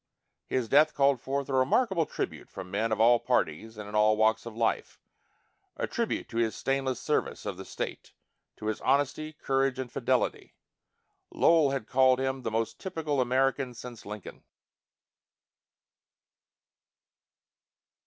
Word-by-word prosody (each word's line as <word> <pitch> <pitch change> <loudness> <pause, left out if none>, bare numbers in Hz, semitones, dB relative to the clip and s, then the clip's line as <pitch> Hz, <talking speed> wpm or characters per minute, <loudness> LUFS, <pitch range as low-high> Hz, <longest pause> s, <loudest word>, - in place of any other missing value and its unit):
His 130 -3 -1
death 150 +5 +4
called 140 -3 +3
forth 140 +1 -2
a 140 - -4
remarkable 165 - +2
tribute - - -5
from 95 -1 -9
men 110 +3 0
of 110 - 0
all 120 +1 +6
parties 110 -1 -1
and 105 -1 -7
in 105 - -9
all 105 0 +4
walks 110 +1 +2
of 115 - -8
life 115 -1 -1 0.8
a - - -1
tribute - - -2
to 115 - -6
his 115 -2 +1
stainless 135 -2 -1
service 150 - -1
of 100 -2 -3
the 95 - -8
state, - - -6 0.5
to - - -9
his 110 -1 -2
honesty, 145 +3 +1
courage, 135 -2 0
and 130 -2 -5
fidelity. - - -1 0.7
Lowell 160 -4 +4
had 135 -5 -2
called 130 +1 +4
him 130 0 -1
"the 115 - -2
most 115 +1 -2
typical 160 -7 -2
American 130 0 +1
since 120 -1 -9
Lincoln." 105 -1 -9
130 Hz, 145 wpm, -29 LUFS, 110-135 Hz, 0.8 s, all